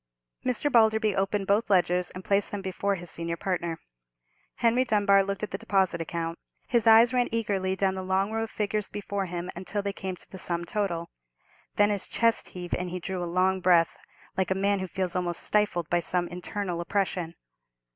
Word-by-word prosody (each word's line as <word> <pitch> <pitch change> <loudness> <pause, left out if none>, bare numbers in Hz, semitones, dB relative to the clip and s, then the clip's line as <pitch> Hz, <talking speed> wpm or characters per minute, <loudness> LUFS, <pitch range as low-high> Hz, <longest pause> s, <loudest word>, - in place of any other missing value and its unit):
Mr. 255 +3 0
Balderby 220 -3 +4
opened 195 +1 0
both 205 +3 +2
ledgers, 180 -2 +2
and 185 0 -9
placed 200 0 +2
them 205 -1 -5
before 195 +1 -1
his 175 -2 -8
senior 170 0 -3
partner. 170 -3 -2 0.8
Henry 235 +2 +3
Dunbar 205 -4 +4
looked 195 +1 -4
at 210 - -3
the 195 - -3
deposit 190 -4 +1
account. 165 0 -4 0.3
His 235 -2 +2
eyes 225 +3 +7
ran 245 -1 +2
eagerly 200 -4 0
down 190 0 +1
the 190 - -4
long 190 +2 0
row 225 0 -1
of - - -12
figures 210 -1 -2
before 200 -1 -3
him 175 +1 -4
until 195 +3 -3
they 200 0 -2
came 190 -2 -4
to - - -12
the 190 - -7
sum 170 -1 -2
total. 170 -4 -2 0.6
Then 205 0 +4
his 200 -2 -1
chest 230 0 +2
heaved, 180 -1 -7
and 180 0 -1
he 180 +1 -4
drew 185 0 -4
a - - -1
long 185 +2 +2
breath, 175 -2 +4 0.4
like 185 -1 0
a 190 - +1
man 200 +1 +1
who 190 - -3
feels 185 -1 -2
almost 175 -2 0
stifled 205 -6 +1
by 175 - +3
some 175 +1 0
internal 180 0 -4
oppression. 180 -2 -1
190 Hz, 195 wpm, -27 LUFS, 180-205 Hz, 0.8 s, eyes